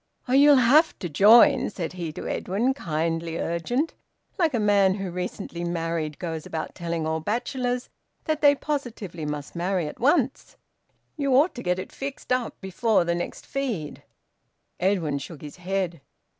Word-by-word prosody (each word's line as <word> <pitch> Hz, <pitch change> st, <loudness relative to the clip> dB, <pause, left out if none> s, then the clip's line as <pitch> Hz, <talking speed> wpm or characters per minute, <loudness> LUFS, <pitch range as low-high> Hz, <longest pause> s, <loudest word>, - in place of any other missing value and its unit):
"Oh, 250 Hz, -, -1 dB
you'll 285 Hz, +2 st, +7 dB
have 275 Hz, +6 st, +5 dB
to 175 Hz, -, -4 dB
join!" 210 Hz, +10 st, +6 dB
said 180 Hz, -5 st, -5 dB
he 170 Hz, -3 st, -4 dB
to -, -, -7 dB
Edwin, 230 Hz, +8 st, 0 dB
kindly 165 Hz, -, -2 dB
urgent, 240 Hz, -, -1 dB, 0.5 s
like 320 Hz, -6 st, +2 dB
a -, -, +1 dB
man 200 Hz, -2 st, +4 dB
who, 195 Hz, -3 st, -4 dB
recently 180 Hz, -1 st, -5 dB
married, 165 Hz, -3 st, -2 dB
goes 165 Hz, -3 st, -4 dB
about 160 Hz, -1 st, -5 dB
telling 170 Hz, -2 st, -3 dB
all 160 Hz, 0 st, -1 dB
bachelors 245 Hz, -, -2 dB, 0.4 s
that 310 Hz, -1 st, -1 dB
they 285 Hz, -1 st, +6 dB
positively 225 Hz, -, -4 dB
must 150 Hz, +1 st, -5 dB
marry 180 Hz, 0 st, 0 dB
at -, -, -8 dB
once. 270 Hz, 0 st, +1 dB, 0.6 s
"You 280 Hz, -3 st, +1 dB
ought 295 Hz, +7 st, +4 dB
to 245 Hz, -, -7 dB
get 180 Hz, -3 st, 0 dB
it 185 Hz, -, -6 dB
fixed 275 Hz, -2 st, -4 dB
up 250 Hz, -2 st, -2 dB
before 200 Hz, +1 st, +1 dB
the 170 Hz, 0 st, 0 dB
next 175 Hz, 0 st, -5 dB
feed." 230 Hz, -, -3 dB, 0.8 s
Edwin 175 Hz, -7 st, +1 dB
shook 150 Hz, +2 st, -9 dB
his 150 Hz, +2 st, -9 dB
head. 180 Hz, -3 st, -2 dB
190 Hz, 160 wpm, -25 LUFS, 165-250 Hz, 0.8 s, you'll